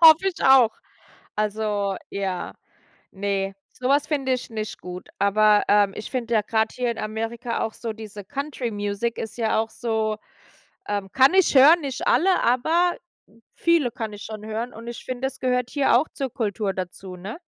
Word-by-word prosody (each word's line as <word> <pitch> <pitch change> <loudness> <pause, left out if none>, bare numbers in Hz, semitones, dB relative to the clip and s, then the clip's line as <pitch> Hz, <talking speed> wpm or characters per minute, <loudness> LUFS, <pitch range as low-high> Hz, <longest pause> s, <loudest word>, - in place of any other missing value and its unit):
Hoffe 325 +3 +8
ich 360 - -5
auch. 265 -4 +7 0.7
Also, 210 -2 -1
ja, 195 -2 -3 0.6
ne, 195 0 -2 0.2
so 255 +1 -3
was 285 +1 +3
finde 275 -4 0
ich 250 - -4
nicht 215 -2 -5
gut. 180 0 -8
Aber, 210 +1 +4
ähm, 205 -1 +4
ich 215 - -6
finde 235 -3 -2
ja 215 - +4
gerade 220 +1 0
hier 245 -1 -1
in 230 - -7
Amerika 225 +2 -3
auch 220 - -2
so 230 - -5
diese 210 -2 -9
Country 280 0 -4
Music 205 +3 -2
ist 220 +1 -6
ja 220 -1 +1
auch 225 - -1
so 220 -3 -1 0.7
ähm, 200 -2 -3
kann 265 +5 +5
ich 380 -5 +4
hören, 300 +6 +8
nicht 270 -3 -4
alle, 370 +1 +4
aber 320 +9 +2 0.6
viele 335 -8 +2
kann 225 -2 -5
ich 205 +1 -9
schon 215 -1 -7
hören. 225 +3 -4
Und 230 +2 -10
ich 235 - -7
finde, 255 +1 -2
es 265 0 -8
gehört 250 -1 0
hier 275 -4 +3
auch 305 - -2
zur 270 -3 -4
Kultur 210 -5 -1
dazu, 185 0 -6
ne? 200 - -7
225 Hz, 180 wpm, -24 LUFS, 210-265 Hz, 0.7 s, Hoffe